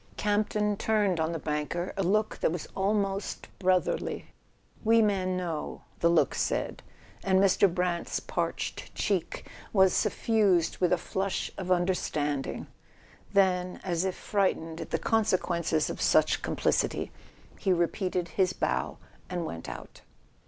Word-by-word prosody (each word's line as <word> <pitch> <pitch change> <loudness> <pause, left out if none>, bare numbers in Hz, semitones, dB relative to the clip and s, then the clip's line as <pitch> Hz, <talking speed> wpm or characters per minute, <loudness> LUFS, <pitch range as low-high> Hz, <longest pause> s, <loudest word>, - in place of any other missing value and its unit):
Campton 210 0 +1
turned 205 -6 +1
on 160 +1 +1
the 165 - -2
banker 150 +4 -2
a 195 - -1
look 210 +4 +1
that - - +2
was 170 -1 -4
almost 195 0 -1
brotherly. 185 -1 0 0.5
"We 225 0 +5
men 190 -4 +2
know. 170 -4 -4 0.2
.the 170 - +4
look 170 - +3
said; - - -1 0.4
and 190 -1 +3
Mr. 195 -1 +4
Brant's 180 -1 -1
parched - - -3
cheek 195 -6 -1 0.2
was 190 -2 +5
suffused 200 -7 +2
with 180 -2 +2
a 180 - +4
flush 190 +2 -2
of 185 - -5
understand¬ 175 -6 0
ing. - - -5 0.7
Then, 185 -2 +2
as 175 -2 0
if 190 -1 -1
frightened 165 -5 -1
at - - -6
the - - +1
consequences 175 -7 +1
of - - -5
such - - +3
complicity, - - 0 0.5
he 195 - +1
repeated 180 0 0
his 185 -2 +1
bow - - -1 0.3
and 175 -2 -2
went 85 - -6
out. - - -9
185 Hz, 140 wpm, -29 LUFS, 170-200 Hz, 0.7 s, We